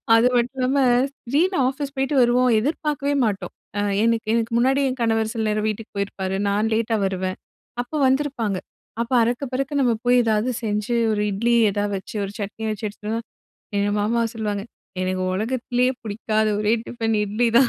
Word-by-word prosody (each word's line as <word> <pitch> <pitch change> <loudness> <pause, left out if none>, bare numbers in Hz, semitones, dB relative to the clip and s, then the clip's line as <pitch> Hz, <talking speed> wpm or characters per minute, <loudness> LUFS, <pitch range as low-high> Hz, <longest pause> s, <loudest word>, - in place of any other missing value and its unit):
அது 230 +2 +5
மட்டும் 250 +2 0
இல்லாம, 265 +2 +2 0.5
திடீர்ன்னு 360 +5 +2
ஆஃபீஸ் 275 +1 -5
போயிட்டு 270 +2 0
வருவோம். 245 +1 +4
எதிர்பார்க்கவே 285 +1 -1
மாட்டோம். 200 -2 -3 0.3
அ - - +2 0.2
எனக்கு 230 -1 +1
எனக்கு 230 0 0
முன்னாடி 270 +3 +3
என் 255 0 -5
கணவர் 225 -1 +1
சில 225 -1 -1
நேரம் 215 0 0
வீட்டுக்கு 215 +1 -6
போயிருப்பாரு. 190 -1 -2
நான் 210 +3 +1
லேட்டா 225 0 +1
வருவேன். 185 -1 -2 0.5
அப்ப 245 - -25
வந்திருப்பாங்க. 260 -7 0 0.4
அப்போ 235 +2 -3
அறக்க 240 +4 -1
பறக்க 275 +2 0
நம்ம 240 -3 +3
போய் 245 0 +5
ஏதாவது 220 +2 +1
செஞ்சு, 210 +2 -1 0.2
ஒரு 210 - 0
இட்லி 235 +4 +1 0.2
எதாவது 205 0 -1
வச்சு 190 - -10
ஒரு 195 - -7
சட்னி 210 +2 -5
வச்சு 215 0 -3
எடுத்து 210 +1 -8
வந்தா, 225 +1 -1 0.6
எங்க 200 0 +1
மாமா 230 +3 +1
சொல்லுவாங்க 210 -2 -2 0.4
"எனக்கு 185 0 -1
உலகத்திலேயே 245 +3 0
பிடிக்காத 215 +1 0
ஒரே 215 +1 +2
டிஃபன் 225 -2 -1
இட்லி 215 +4 0
தான்! 260 -3 +5
225 Hz, 170 wpm, -23 LUFS, 210-255 Hz, 0.6 s, அது